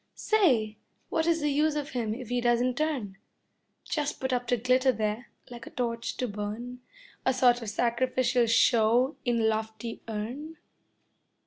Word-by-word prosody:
Say, 250 - +2 0.3
what 320 0 0
is 330 -1 +2
the 295 0 +1
use 300 +2 +2
of 290 -1 -3
him 225 -4 -2
if 250 -2 -8
he 245 0 0
doesn't 240 +1 +2
turn? 260 -11 -2 0.7
Just 295 -2 -2
put 260 -1 -1
up 245 -1 -1
to 245 - +2
glitter 255 +3 +3
there, 220 +1 -2 0.2
like 240 -1 -9
a - - -7
torch 230 -2 -3
to 250 - -1
burn, 215 +4 -5 0.4
A 260 - +3
sort 245 -1 +4
of 225 - -4
sacrificial 240 +2 +1
show 230 +3 +4
in 240 -2 +1
a - - +1
lofty 220 +1 -2
urn? 245 +9 -5
245 Hz, 160 wpm, -28 LUFS, 225-260 Hz, 0.7 s, sort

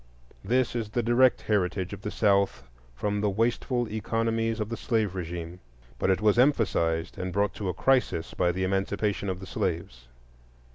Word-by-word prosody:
This 125 +4 +1
is 115 -3 -2
the 120 +2 -1
direct 120 +2 +4
heritage 95 -2 0
of 100 - -8
the 105 - -4
South 100 - +2 0.3
from 105 +8 -1
the 105 - +2
wasteful 120 +4 0
economies 115 +1 -1
of 105 -1 -2
the 115 - -3
slave 110 -5 0
régime; 85 -1 -5 0.4
but - - +1
it 95 0 +2
was 110 +2 +3
emphasized 90 - +1
and 90 0 -3
brought 100 +2 +1
to 100 -3 -4
a - - -1
crisis 125 -11 +1
by 90 - +2
the 95 +2 -2
Emancipation 100 +1 -1
of 90 -1 -3
the 95 - -8
slaves. 80 -10 -3
100 Hz, 175 wpm, -27 LUFS, 90-115 Hz, 0.4 s, direct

